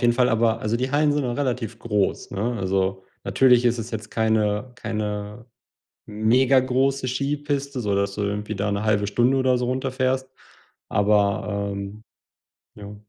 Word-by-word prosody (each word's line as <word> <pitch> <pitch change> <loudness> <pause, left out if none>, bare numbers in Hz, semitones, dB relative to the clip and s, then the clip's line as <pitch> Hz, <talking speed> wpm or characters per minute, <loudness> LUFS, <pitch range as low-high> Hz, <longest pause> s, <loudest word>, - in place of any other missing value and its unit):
jeden 120 -2 +3
Fall, 125 0 +3
aber 115 0 +2
also, 110 +2 0
die 130 +2 -2
Hallen 145 +1 +3
sind 145 0 0
nun 120 -2 -2
relativ 125 -4 -2
groß, 105 -4 -1
ne? 115 +5 -2
Also, 95 0 -1 0.2
natürlich 125 -2 +4
ist 120 0 +2
es 115 +1 -5
jetzt 105 -1 -6
keine 110 +1 0
keine 105 0 -4 0.6
megagroße 130 +4 +2
Skipiste, 140 +1 -2
so 105 -2 -1
dass 100 0 -1
du 105 - -2
irgendwie 105 +1 -3
da 100 +1 -1
'ne 100 +1 -1
1/2 105 -1 +2
Stunde 120 +5 +2
oder 130 -1 +2
so 125 - -1
runterfährst, 130 +1 -1 0.6
aber, 100 0 +1
ähm 100 +2 -7 0.7
ja. 105 0 -9
115 Hz, 155 wpm, -23 LUFS, 105-130 Hz, 0.7 s, natürlich